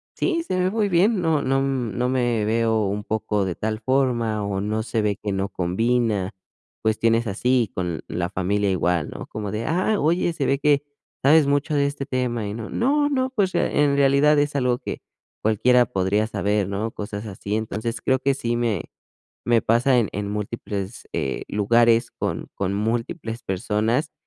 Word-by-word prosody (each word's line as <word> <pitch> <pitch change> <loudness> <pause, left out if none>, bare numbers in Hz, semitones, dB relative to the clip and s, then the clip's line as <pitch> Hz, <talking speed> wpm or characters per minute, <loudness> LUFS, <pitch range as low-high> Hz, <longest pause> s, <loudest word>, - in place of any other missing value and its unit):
"Sí, 335 -2 0
se 185 - -2
ve 185 0 +2
muy 215 -2 +1
bien, 195 +4 +3
no 160 -3 +2
no 135 0 +1
no 125 -3 -1
me 120 -4 +1
veo 110 -1 +1
un 100 +1 -2
poco 105 -2 -1
de 90 -2 -2
tal 110 0 -3
forma 120 -4 +1
o 100 -1 -2
no 110 +2 -1
se 115 0 -1
ve 105 -2 0
que 100 -2 -2
no 95 +1 -1
combina", 105 +2 0 0.5
cuestiones 115 +1 +2
así 120 +2 +1
con 90 -3 -2
la 90 0 -2
familia 100 +2 0
igual, 90 -3 0
¿no?, - - -7
como 105 -2 -5
de: 110 +3 -3
"Ah, 185 +6 +1
oye, 170 +3 +2
se 145 -4 -2
ve 135 - +2
que 145 0 +3 0.4
sabes 150 +2 +5
mucho 145 +2 +1
de 140 -1 +3
este 140 -1 -3
tema 125 -5 -2
y 100 - -4
no, 115 0 -6
no 290 +4 +1
no, 260 -2 0
pues, 205 -8 0
en 145 -1 +2
realidad 140 +2 +4
es 145 0 0
algo 125 -2 +1
que - - -6 0.4
cualquiera 120 +3 +4
podría 100 0 0
saber", 105 -2 0
¿no? 100 +3 -2
Cosas 105 0 -6
así, 100 0 -4
entonces, 110 0 -3
creo 130 0 +2
que 135 +1 +1
sí 120 -3 -2
me 115 -7 -1 0.6
me 120 -1 +3
pasa 125 +3 +3
en 115 -4 +2
en 100 +1 -3
múltiples, 105 0 -5
eh, 65 - -2
lugares 115 +3 +3
con - - -3
con 100 0 -1
múltiples 115 +3 -2
personas 110 - 0
115 Hz, 180 wpm, -23 LUFS, 105-140 Hz, 0.6 s, sabes